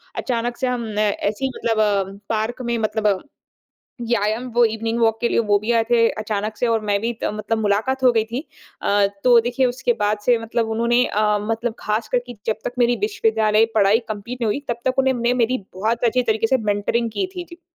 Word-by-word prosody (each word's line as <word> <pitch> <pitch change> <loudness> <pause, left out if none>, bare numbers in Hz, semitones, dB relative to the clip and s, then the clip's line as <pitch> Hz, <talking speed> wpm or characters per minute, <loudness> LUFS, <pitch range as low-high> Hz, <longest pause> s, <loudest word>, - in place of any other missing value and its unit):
अचानक 240 -1 -2
से 260 - -1
हम 240 -2 -2
ऐसे 210 +3 0
ही 265 - -1
मतलब 225 -2 -1
अ, 200 -2 0
पार्क 225 +3 -2
में 235 0 0
मतलब 215 -3 0 0.9
या 225 -4 +1
याम 220 +4 -1
वो 240 0 +4
इवनिंग 225 +1 -1
वॉक 225 -1 +2
के 235 - +1
लिए - - 0
वो 205 0 +4
भी 215 +3 -1
आए 225 - +2
थे 230 -1 +4
अचानक 215 0 -3
से 245 - 0
और 225 -1 +1
मैं 205 -1 +1
भी 230 +2 -1
त - - -1
मतलब 215 +1 -2
मुलाकात 220 +6 0
हो 250 - +6
गई 220 -1 +2
थी। 235 +4 -4 0.4
अ, 200 0 +3 0.2
तो 245 -2 +7
देखिए 245 +2 0
उसके 245 0 0
बाद 210 0 +1
से 240 -2 +4
मतलब 225 0 -2
उन्होंने 235 +2 +2
अ, 210 0 +1
मतलब 225 0 -2
ख़ास 215 +1 -2
करके 245 0 -1
जब 220 - 0
तक - - -3
मेरी 240 0 +3
विश्वविद्यालय 225 - +2
पढ़ाई 205 +1 +4
कंप्लीट 220 +4 -6
नहीं 230 - 0
हुई 215 +7 0
तब 235 0 -2
तक 260 +1 0
उन्होंने 265 -2 +2
मैं 245 - +3
मेरी 255 +3 -1 0.2
बहुत 225 +5 -1
अच्छी 245 +2 +2
तरीके 225 -1 +1
से 265 - +3
मेंटरिंग 225 +3 0
की 380 - -2
थी। 355 - -4
जी। 340 0 -12
225 Hz, 220 wpm, -21 LUFS, 215-240 Hz, 0.9 s, तो